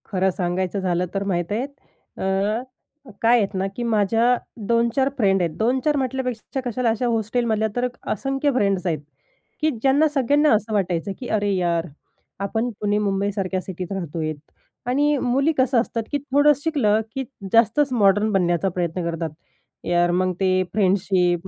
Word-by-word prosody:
खरं 190 Hz, -2 st, +1 dB
सांगायचं 185 Hz, +2 st, -1 dB
झालं 180 Hz, -1 st, 0 dB
तर 195 Hz, 0 st, -1 dB
माहीत 175 Hz, -3 st, -2 dB
आहेत 235 Hz, +6 st, -1 dB, 0.5 s
अ, 195 Hz, +4 st, 0 dB, 0.6 s
काय 235 Hz, +2 st, +5 dB
आहेत 210 Hz, -3 st, 0 dB
ना 190 Hz, +1 st, 0 dB
की 240 Hz, -, -3 dB
माझ्या 230 Hz, +2 st, +2 dB, 0.3 s
2-4 235 Hz, +4 st, +2 dB
फ्रेंड 195 Hz, -5 st, +3 dB
आहेत. 170 Hz, -2 st, 0 dB
2-4 260 Hz, +6 st, +1 dB
म्हटल्यापेक्षा 260 Hz, -1 st, -3 dB
कशाला 245 Hz, 0 st, 0 dB
अशा 225 Hz, +2 st, 0 dB
हॉस्टेलमधल्या 220 Hz, -1 st, 0 dB
तर 245 Hz, 0 st, +1 dB, 0.2 s
असंख्य 270 Hz, +6 st, 0 dB
फ्रेंड्स 200 Hz, -5 st, +1 dB
आहेत. 160 Hz, -3 st, 0 dB, 0.6 s
की 310 Hz, -, +3 dB
ज्यांना 275 Hz, +4 st, +4 dB
सगळ्यांना 290 Hz, +2 st, +3 dB
असं 215 Hz, +1 st, -2 dB
वाटायचं 190 Hz, -2 st, 0 dB
की 255 Hz, -, -6 dB
अरे 205 Hz, -1 st, 0 dB
यार, 170 Hz, -2 st, 0 dB, 0.5 s
आपण 220 Hz, +4 st, -1 dB
पुणे 205 Hz, 0 st, +1 dB
मुंबईसारख्या 195 Hz, -2 st, -1 dB
सिटीत 185 Hz, 0 st, -7 dB
राहतो 170 Hz, -5 st, -4 dB
आहेत. 155 Hz, 0 st, -2 dB, 0.5 s
आणि 290 Hz, +4 st, +2 dB
मुली 270 Hz, +5 st, +2 dB
कसं 260 Hz, -1 st, +3 dB
असतात 230 Hz, -1 st, -3 dB
की 290 Hz, -, +1 dB
थोडंसं 285 Hz, +1 st, +3 dB
शिकलं 235 Hz, -10 st, +2 dB
की 270 Hz, -, -1 dB, 0.3 s
जास्तच 230 Hz, +5 st, +4 dB
मॉडर्न 205 Hz, -1 st, +3 dB
बनण्याचा 180 Hz, -1 st, +1 dB
प्रयत्न 175 Hz, 0 st, -2 dB
करतात. 165 Hz, -1 st, -3 dB, 0.6 s
यार 175 Hz, 0 st, +2 dB
मग 185 Hz, +1 st, +1 dB
ते 185 Hz, -1 st, +2 dB
फ्रेंडशिप 185 Hz, -3 st, +1 dB
210 Hz, 155 wpm, -22 LUFS, 185-250 Hz, 0.6 s, काय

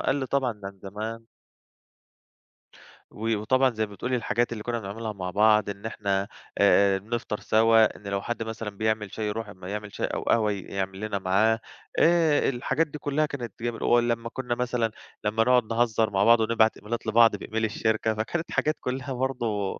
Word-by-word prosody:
قَلّ 135 Hz, 0 st, +1 dB
طبعًا 125 Hz, -6 st, -1 dB
عن 100 Hz, 0 st, -7 dB
زمان. 110 Hz, +3 st, -6 dB, 1.9 s
و 115 Hz, +1 st, -1 dB
وطبعًا 130 Hz, +5 st, +3 dB
زي 110 Hz, 0 st, -1 dB
ما 105 Hz, -, -13 dB
بتقولي، 125 Hz, +5 st, -2 dB
الحاجات 120 Hz, 0 st, 0 dB
اللي 110 Hz, -2 st, -5 dB
كنّا 120 Hz, -1 st, -2 dB
بنعملها 110 Hz, +2 st, -5 dB
مع 90 Hz, -2 st, -5 dB
بعض، 105 Hz, +1 st, +4 dB
إن 100 Hz, +2 st, -7 dB
إحنا 100 Hz, -2 st, -1 dB, 0.3 s
آآ 100 Hz, -1 st, +5 dB
بنفطَر 105 Hz, +1 st, -4 dB
سوا، 110 Hz, 0 st, +4 dB
إن 105 Hz, -, -12 dB
لو 100 Hz, 0 st, -1 dB
حَد 120 Hz, +2 st, -3 dB
مثلًا 110 Hz, -1 st, -5 dB
بيعمل 110 Hz, 0 st, -2 dB
شاي 110 Hz, -, -3 dB
يرُوح، 105 Hz, 0 st, -4 dB
أمّا 95 Hz, -2 st, -10 dB
يعمل 105 Hz, 0 st, -5 dB
شاي -, -, -1 dB
أو -, -, -3 dB
قهوة 110 Hz, -2 st, +2 dB
ي 100 Hz, -2 st, -4 dB
يعمل 95 Hz, 0 st, -4 dB
لنا 105 Hz, -1 st, -2 dB
معاه 105 Hz, +5 st, +2 dB, 0.4 s
آآ، 165 Hz, -3 st, +4 dB
الحاجات 135 Hz, +5 st, 0 dB
دي 150 Hz, -, -8 dB
كلّها 150 Hz, +1 st, 0 dB
كانت 125 Hz, -8 st, -6 dB
جميلة 120 Hz, -1 st, -2 dB
ولمّا 120 Hz, -1 st, +2 dB
كنّا 125 Hz, -1 st, -3 dB
مثلًا 120 Hz, -2 st, -1 dB, 0.3 s
لمّا 110 Hz, +2 st, +2 dB
نقعُد 125 Hz, 0 st, +4 dB
نهزّر 115 Hz, -2 st, +2 dB
مع 100 Hz, 0 st, +2 dB
بعض 115 Hz, +1 st, +6 dB
ونبعَت 110 Hz, 0 st, +2 dB
إميلات 115 Hz, +1 st, -5 dB
لبعض 115 Hz, 0 st, +5 dB
بemail 110 Hz, +2 st, -4 dB
الشركة، 110 Hz, 0 st, 0 dB
فكانت 160 Hz, +10 st, -3 dB
حاجات 155 Hz, +1 st, +1 dB
كلّها 130 Hz, +1 st, -3 dB
برضه 120 Hz, -6 st, -2 dB
110 Hz, 180 wpm, -26 LUFS, 105-120 Hz, 1.9 s, بعض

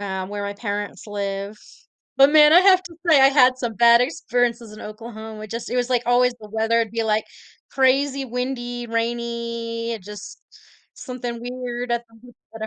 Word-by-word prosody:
um, 190 Hz, -2 st, -4 dB
where 205 Hz, 0 st, -5 dB
my 200 Hz, 0 st, -3 dB
parents 205 Hz, 0 st, -5 dB
live, 200 Hz, 0 st, -4 dB, 0.6 s
but 275 Hz, +1 st, +7 dB
man, 300 Hz, 0 st, +7 dB
I 350 Hz, -, +8 dB
have 375 Hz, -1 st, +5 dB
to 355 Hz, -2 st, -12 dB
say 305 Hz, -4 st, +6 dB
I 270 Hz, -, +8 dB
had 255 Hz, -2 st, +4 dB
some 240 Hz, -3 st, -3 dB
bad 235 Hz, +1 st, +6 dB
experiences 245 Hz, -4 st, -1 dB
in -, -, -10 dB
Oklahoma. 220 Hz, 0 st, -9 dB
It 215 Hz, -, -12 dB
just 230 Hz, 0 st, -5 dB
it 250 Hz, -, -2 dB
was, 245 Hz, 0 st, 0 dB
like, 245 Hz, -2 st, +1 dB
always 245 Hz, +1 st, +3 dB
the 210 Hz, -1 st, -12 dB
weather 225 Hz, +1 st, +1 dB
would 225 Hz, -2 st, 0 dB
be 230 Hz, 0 st, -2 dB
like 215 Hz, 0 st, +1 dB, 0.5 s
crazy 270 Hz, +1 st, +2 dB
windy, 245 Hz, -1 st, -4 dB
rainy, 235 Hz, 0 st, -3 dB
just 205 Hz, +1 st, -10 dB, 0.5 s
something 245 Hz, -3 st, -6 dB
weird 245 Hz, 0 st, -5 dB
at 235 Hz, 0 st, -1 dB
the 225 Hz, -, -21 dB
ho 245 Hz, -1 st, -15 dB, 0.2 s
at 220 Hz, 0 st, -5 dB
235 Hz, 185 wpm, -22 LUFS, 220-250 Hz, 0.6 s, I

